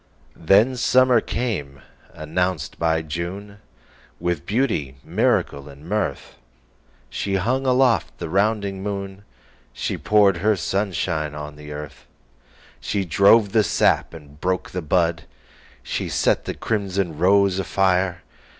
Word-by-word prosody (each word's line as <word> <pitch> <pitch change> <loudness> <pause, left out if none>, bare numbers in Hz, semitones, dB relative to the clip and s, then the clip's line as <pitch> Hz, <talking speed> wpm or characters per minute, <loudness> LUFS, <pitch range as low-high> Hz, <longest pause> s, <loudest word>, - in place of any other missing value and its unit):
Then 105 +9 +4
summer 125 -1 +4
came, 90 - -3 0.3
announced 80 -1 -3
by 80 -1 +1
June, 90 +6 -6 0.6
With 85 -3 -2
beauty, 105 - -1
miracle 70 -1 0
and 70 +3 -13
mirth. 105 - -3 0.7
She 95 +10 -3
hung 130 +8 0
aloft 125 -1 +2
the 85 - -5
rounding 100 +1 0
moon, 100 -1 -5 0.5
She - - -3
poured 100 -3 +4
her 105 +5 +2
sunshine 90 -6 -2
on 75 0 -7
the 75 0 -11
earth, 75 -2 -9 0.7
She 95 +10 -2
drove 100 +4 +4
the 110 0 +4
sap 85 - +1
and 75 -2 -14
broke 95 0 -1
the 90 - -3
bud, 85 0 0 0.6
She - - -3
set - - +1
the - - -4
crimson 100 -7 -2
rose 95 +1 +3
afire. 95 -2 0
95 Hz, 125 wpm, -22 LUFS, 80-105 Hz, 0.7 s, Then